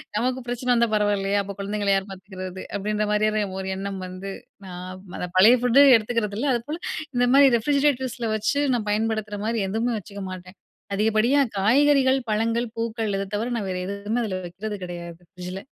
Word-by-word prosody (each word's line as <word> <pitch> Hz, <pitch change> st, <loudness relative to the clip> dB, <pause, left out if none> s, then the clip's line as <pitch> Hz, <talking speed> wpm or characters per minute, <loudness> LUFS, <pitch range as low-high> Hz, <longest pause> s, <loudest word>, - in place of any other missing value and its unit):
நமக்கு 250 Hz, +4 st, 0 dB
பிரச்சனை 245 Hz, +1 st, -3 dB
வந்தா 235 Hz, -1 st, +3 dB
பரவாயில்லயா! 205 Hz, -1 st, +1 dB
அப்போ 200 Hz, 0 st, -6 dB
குழந்தைங்கள 205 Hz, 0 st, -2 dB
யார் 195 Hz, +1 st, 0 dB
பார்த்துக்கிறது. 185 Hz, -1 st, -8 dB
அப்பிடின்ற 210 Hz, +1 st, -1 dB
மாரியான 215 Hz, 0 st, +2 dB, 0.2 s
ஒரு 190 Hz, -, -5 dB
எண்ணம் 195 Hz, 0 st, -4 dB
வந்து 185 Hz, +2 st, -7 dB, 0.4 s
நான் 180 Hz, 0 st, -7 dB, 0.2 s
அந்த 180 Hz, -, -3 dB
பழைய 220 Hz, +7 st, +8 dB
ஃபுட் 250 Hz, +2 st, +4 dB, 0.2 s
எடுத்துக்கிறது 215 Hz, -2 st, -1 dB
இல்ல. 285 Hz, -, 0 dB
அதுப்போல 295 Hz, +8 st, -3 dB, 0.4 s
இந்த 245 Hz, 0 st, +3 dB
மாரி 280 Hz, -1 st, +8 dB
ரெஃப்ரிஜிரேட்டர்ஸ்ல 260 Hz, -3 st, 0 dB
வச்சு 220 Hz, +7 st, 0 dB
நான் 215 Hz, -3 st, -3 dB
பயன்படுத்துகிற 215 Hz, -1 st, -1 dB
மாரி 225 Hz, -1 st, 0 dB
எதுவுமே 230 Hz, +4 st, 0 dB
வச்சுக்க 200 Hz, 0 st, -9 dB
மாட்டேன். 185 Hz, +1 st, -10 dB, 0.4 s
அதிகப்படியா 220 Hz, +6 st, +3 dB, 0.2 s
காய்கறிகள், 270 Hz, +5 st, +4 dB
பழங்கள், 230 Hz, +2 st, 0 dB
பூக்கள் 225 Hz, -2 st, -2 dB
இத 195 Hz, 0 st, -3 dB
தவிர 225 Hz, +4 st, -2 dB
நான் 200 Hz, -3 st, -3 dB
வேற 185 Hz, -, -2 dB
எதுவுமே 205 Hz, +4 st, -2 dB
அதில 190 Hz, -4 st, -3 dB
வைக்கிறது 205 Hz, +4 st, -6 dB
கிடையாது. 175 Hz, -1 st, -8 dB
ஃப்ரிட்ஜ் 180 Hz, 0 st, -7 dB
ல. -, -, -4 dB
210 Hz, 170 wpm, -24 LUFS, 195-235 Hz, 0.4 s, பழைய